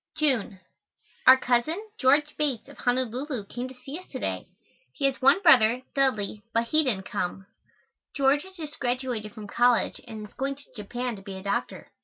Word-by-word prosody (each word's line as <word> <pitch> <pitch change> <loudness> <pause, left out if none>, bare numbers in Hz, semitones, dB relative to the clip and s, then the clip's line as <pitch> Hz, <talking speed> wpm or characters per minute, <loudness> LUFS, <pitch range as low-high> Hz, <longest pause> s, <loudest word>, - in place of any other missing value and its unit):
June. 255 -10 +1 0.7
Our 260 0 +10
cousin, 250 +8 +1 0.2
George 290 +3 +3
Bates, 270 -7 -1
of 285 - -14
Honolulu, 250 -1 -1
came 245 +5 -5
to 260 - -11
see 270 +6 -8
us 370 - -15
to - - -7
day. - - -3 0.5
He 280 - -1
has 270 0 0
one 275 +9 +5
brother, 250 -5 +6
Dudley, 215 -7 0
but 230 0 +1
he 310 +3 +5
didn't 205 -8 -1
come. 185 +2 -3 0.7
George 280 +1 +3
has 380 +3 -13
just 310 -3 -8
graduated 245 -4 -2
from 215 -2 -8
college 240 +3 +2
and 215 -2 -7
is - - -24
going 275 +1 -2
to 280 -1 -18
Japan 240 +3 -4
to - - -11
be 195 -1 -8
a 190 - -8
doctor. 200 0 -3
255 Hz, 185 wpm, -27 LUFS, 220-275 Hz, 0.7 s, Our